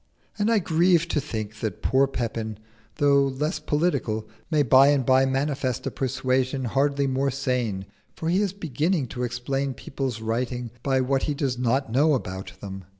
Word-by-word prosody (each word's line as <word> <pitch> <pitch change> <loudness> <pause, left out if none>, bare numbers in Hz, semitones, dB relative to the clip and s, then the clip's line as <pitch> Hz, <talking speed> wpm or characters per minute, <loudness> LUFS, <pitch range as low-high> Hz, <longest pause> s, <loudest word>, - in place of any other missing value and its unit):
And 205 +2 +2
I 230 - +4
grieve 170 -2 +3
to 150 - +1
think 110 -6 -5
that 110 - -4
poor 135 +2 +3
Pepin, 115 -4 -3 0.4
though 140 -2 +4
less 150 +5 -2
political, 145 -9 0 0.2
may 155 -3 +3
by 130 +2 +6
and 140 -3 +3
by 130 +1 +4
manifest 135 -2 -1
a - - -2
persuasion 130 0 -1
hardly 140 +3 +1
more 135 +1 +1
sane, 125 -7 -1 0.3
for 160 - -4
he 180 +4 +2
is 200 -3 0
beginning 165 -3 -1
to 125 - -5
explain 130 +2 -2
people's 130 -2 -4
writing 120 +1 -2
by 135 0 +1
what 135 +1 +1
he 145 - 0
does 135 -4 -1
not 125 +1 0
know 145 +5 +4
about 95 -6 -5
them. 95 -1 -7
135 Hz, 170 wpm, -25 LUFS, 125-145 Hz, 0.4 s, by